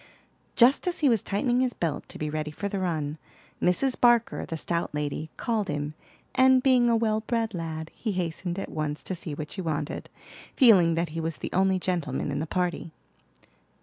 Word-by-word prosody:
Just 255 +9 +5
as 355 -1 -1
he 290 - +5
was 225 -5 +3
tightening 240 +5 0
his 255 -2 0
belt 165 -4 -3
to - - -8
be 155 - -3
ready 155 0 -3
for 175 +7 -4
the 200 -1 -3
run, 155 -4 -2 0.4
Mrs. 250 +9 +2
Barker, 240 -1 +3
the 165 - -4
stout 170 -1 -2
lady, 150 +1 -3
called 220 -4 -1
him; 145 -1 -3 0.4
and 260 0 +5
being 250 -3 +4
a 230 - +4
well 220 -1 +1
bred 225 -1 -1
lad, 160 -2 -5
he 220 -4 -3
hastened 175 0 -3
at 195 - -5
once 150 -1 -3
to - - -4
see 165 -4 -5
what 150 0 -6
she 190 - -4
wanted, 155 -4 -3 0.5
feeling 185 -10 +6
that 170 0 -1
he 165 +2 -5
was 165 0 -3
the - - -6
only 190 +1 +3
gentleman 165 -7 -2
in 140 - -2
the 160 - -3
party. 175 -2 -2
180 Hz, 195 wpm, -27 LUFS, 155-225 Hz, 0.5 s, feeling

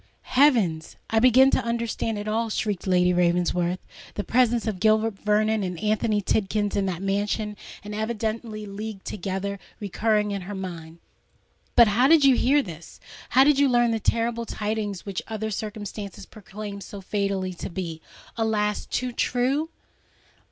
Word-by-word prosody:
heavens—I 225 - +2
begin 255 +3 +6
to - - +2
understand 235 -1 -2
it 205 +1 -5
all!" 225 +1 0
shrieked 205 -3 -2
Lady 180 -1 +3
Ravensworth, 175 0 +1 0.4
the 205 - -2
presence 240 0 +2
of 215 -5 -2
Gilbert 215 0 +2
Vernon 215 +1 +2
and 180 -3 -3
Anthony 215 -1 +1
Tidkins 205 +1 0
in 200 -1 +1
that 185 0 -3
mansion, 205 +2 -1 0.3
and 210 +1 -7
evidently 220 0 -3
leagued 205 0 -7
together, 200 +1 -4 0.2
recurring 210 +1 0
to 200 -1 -2
her 195 +2 -7
mind. 170 -4 -7 0.8
"But 235 -3 +7
how 240 +6 +4
did 315 -1 +6
you 270 -2 +6
hear 280 +4 +3
this! 170 -3 -10 0.3
how 260 - +6
did 285 0 +4
you 285 -1 +4
learn 240 -1 +3
the 225 - 0
terrible 230 +1 0
tidings 210 -3 -3
which 195 -3 -3
other 220 -1 -3
circumstances 210 -2 -6
proclaim 205 -1 -8
so 200 - -8
fatally 195 -1 -2
to 175 - -6
be, 170 -3 -5 0.4
alas! 210 -2 0
too 250 0 -2
true?" 260 +6 0
210 Hz, 150 wpm, -25 LUFS, 195-230 Hz, 0.8 s, But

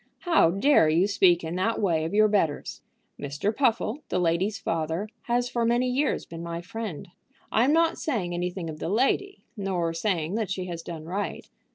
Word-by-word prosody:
"How 335 - +4
dare 195 - +4
you 165 +4 +3
speak 185 -4 +3
in 165 +2 -4
that 225 +5 0
way 165 -6 +1
of 165 - -4
your 215 0 +6
betters? 190 -8 -1 0.4
Mr. 145 +10 -2
Puffle, 245 0 +1
the 185 - 0
lady's 180 +4 +1
father, 165 +2 -2 0.2
has 245 0 +1
for 240 -1 -1
many 240 +2 +2
years 265 +3 0
been 165 0 -8
my 170 0 -4
friend. 185 -2 -6 0.4
I 225 +3 +4
am 275 - +3
not 330 +1 +2
saying 205 - -2
anything 175 0 -3
of 155 -1 -7
the - - -3
lady, 275 - 0
nor 185 -5 -1
saying 165 -1 -1
that 220 -2 -1
she 185 -1 -3
has 170 -2 -5
done 165 -2 -7
right. 195 +5 -4
190 Hz, 190 wpm, -26 LUFS, 170-230 Hz, 0.4 s, your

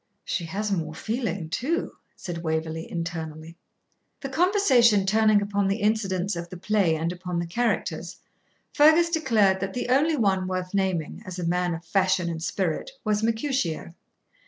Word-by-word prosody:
'She 170 - -2
has 200 +6 -3
more 160 -5 -2
feeling 215 -4 -3
too,' 280 - -2 0.2
said 175 -2 -6
Waverley, 160 0 -3
internally. 165 -1 -5 0.7
The 275 - -4
conversation 265 - +4
turning 215 0 +4
upon 200 -1 0
the 195 +2 0
incidents 200 -3 0
of 170 0 -6
the 180 - -8
play 195 -3 +2
and 165 +2 -1
upon 180 -1 -5
the 170 - -1
characters, 235 +7 -2 0.6
Fergus 315 +3 +5
declared 220 - +3
that 195 0 -3
the 245 - -3
only 295 +5 +3
one 190 -5 +1
worth 185 0 -3
naming, 190 -5 -1
as 185 -1 -7
a 180 - -3
man 175 0 0
of 165 +1 -10
fashion 185 -1 +1
and 160 -1 -5
spirit, 175 - -2
was 210 -1 +1
Mercutio. 225 - -1
190 Hz, 160 wpm, -25 LUFS, 170-220 Hz, 0.7 s, Fergus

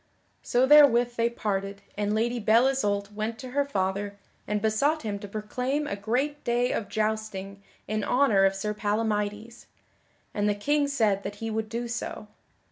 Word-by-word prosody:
So 245 +2 +2
therewith 265 -4 +6
they 230 0 +2
parted 200 -3 -3
and 210 +1 -1
Lady 240 +2 0
Belle 225 +3 +4
Isoult 205 -6 -1
went 220 +2 -3
to 255 - -8
her 285 +2 +1
father 200 -4 -2 0.3
and 210 0 0
besought 230 +9 +1
him 205 -2 -3
to 205 - -8
proclaim 250 +8 -2
a 200 - -3
great 255 +9 -2
day 245 +1 +1
of 205 - -3
jousting 215 -2 -3 0.3
in 215 0 -1
honor 245 -6 +3
of 195 0 +2
Sir 210 +2 -2
Palamydes, 210 +1 -2 0.7
and 205 0 +1
the 205 - +1
King 290 +7 +1
said 220 -8 +1
that 205 - -6
he 225 +1 -5
would 220 0 -2
do 235 +2 -3
so. 230 -2 -5
220 Hz, 170 wpm, -27 LUFS, 205-245 Hz, 0.7 s, therewith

